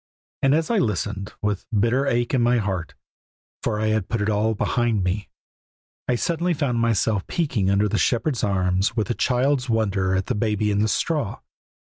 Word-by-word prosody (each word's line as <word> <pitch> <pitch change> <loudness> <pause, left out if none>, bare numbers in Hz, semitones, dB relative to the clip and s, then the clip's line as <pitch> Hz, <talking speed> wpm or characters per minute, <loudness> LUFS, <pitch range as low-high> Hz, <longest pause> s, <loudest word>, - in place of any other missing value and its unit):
And 135 +1 +4
as 160 +6 0
I 230 - +3
listened, 105 - -2
with 105 -2 -1
a - - -2
bitter 120 +6 +2
ache 120 0 0
in 130 - +3
my 120 +1 +3
heart 95 -6 -3 0.7
for 105 - -1
I 110 0 +1
had 110 -3 0
put 115 - -1
it 105 +1 0
all 110 +2 +1
behind 115 -2 0
me 95 +3 -2 0.8
I 125 - +2
suddenly 170 +6 0
found 135 -6 0
myself 110 -3 +1
peeking 130 - 0
under 100 +2 +3
the 110 +1 0
shepherds' 125 0 0
arms 95 +1 +1
with 110 +1 0
a - - +2
child's 130 +2 +1
wonder 100 -4 +1
at 95 0 0
the - - -1
Baby 105 -1 0
in 100 - +1
the 110 - +2
straw. 140 - -1
110 Hz, 190 wpm, -23 LUFS, 100-125 Hz, 0.8 s, And